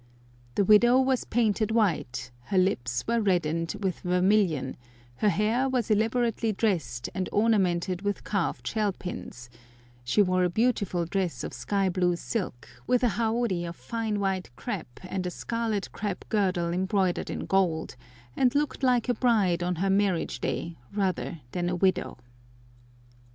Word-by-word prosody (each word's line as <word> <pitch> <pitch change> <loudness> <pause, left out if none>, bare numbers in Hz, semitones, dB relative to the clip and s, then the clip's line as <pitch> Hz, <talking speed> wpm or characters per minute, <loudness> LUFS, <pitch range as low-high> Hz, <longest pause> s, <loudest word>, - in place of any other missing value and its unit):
The 200 - +3
widow 240 +5 +6
was 260 -1 +1
painted 220 -2 +1
white; 150 - 0
her 195 - -1
lips 120 -10 +1
were 235 0 +1
reddened 165 -3 0
with 190 -3 -1
vermilion; 180 -6 +2 0.4
her 210 - +3
hair 225 +6 +1
was 245 -4 0
elaborately 225 +1 +1
dressed 170 - -1
and 185 -1 -2
ornamented 190 -4 +2
with 205 0 -2
carved 200 -5 -2
shell 210 -3 0
pins; 125 -9 -7 0.6
she 125 - +3
wore 185 -1 +2
a 180 - +2
beautiful 200 -4 +1
dress 170 -7 -2
of - - -5
sky 195 -2 0
blue 180 -1 +1
silk, 175 - -4 0.2
with 250 0 +2
a 245 - +4
haori 225 -4 0
of 170 0 -5
fine 215 - -3
white 190 -2 -1
crêpe 205 - -4 0.2
and 185 -1 -3
a - - -1
scarlet 225 +1 -2
crêpe 200 -3 -4
girdle 185 -5 +1
embroidered 190 0 0
in - - -4
gold, 175 -7 +1 0.4
and 255 0 +2
looked 295 -1 0
like 250 -3 +2
a 245 - +3
bride 215 -8 +2
on 180 +1 0
her 190 +4 0
marriage 195 -3 +1
day 170 -3 -3
rather 185 -5 -2
than 175 -1 -1
a 180 - -1
widow. 185 -5 +1
195 Hz, 150 wpm, -27 LUFS, 175-220 Hz, 0.6 s, widow